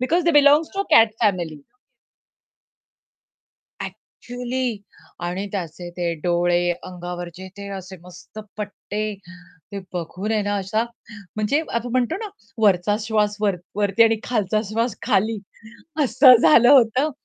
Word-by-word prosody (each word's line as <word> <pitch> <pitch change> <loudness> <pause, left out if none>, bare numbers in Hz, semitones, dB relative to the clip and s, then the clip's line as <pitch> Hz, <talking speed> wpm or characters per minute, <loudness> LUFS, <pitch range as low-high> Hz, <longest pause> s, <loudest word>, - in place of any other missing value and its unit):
Because 330 +8 +1
they 340 - +4
belong 295 +1 +6
to 395 - 0
cat 225 -1 +6
family. 175 -8 0 2.2
Actually 245 -2 -5 0.5
आणि 180 +3 -3
त्याचे 175 -2 -5
ते 175 -1 -1
डोळे, 175 +1 +1
अंगावरचे 175 0 -7
ते 200 0 -8
असे 190 0 -9
मस्त 180 +4 -13 0.2
पट्टे. 210 0 -4 0.6
ते 200 - -4
बघून 180 +4 -4
आहे 215 -1 +1
ना 205 0 -1
असा 200 +3 -1 0.5
म्हणजे 215 +8 +1
आपण 235 +1 -2
म्हणतो 255 +5 +1
ना 440 0 -5 0.3
वरचा 205 0 +3
श्वास 210 -1 0
वर 200 -3 +1 0.2
वरती 205 +1 +3
आणि 225 0 +4
खालचा 215 -3 0
श्वास 230 +1 -1
खाली, 220 -1 +1 0.7
असं 255 +1 +7
झालं 240 -4 +6
होतं, 260 +2 +4
210 Hz, 125 wpm, -22 LUFS, 185-240 Hz, 2.2 s, असं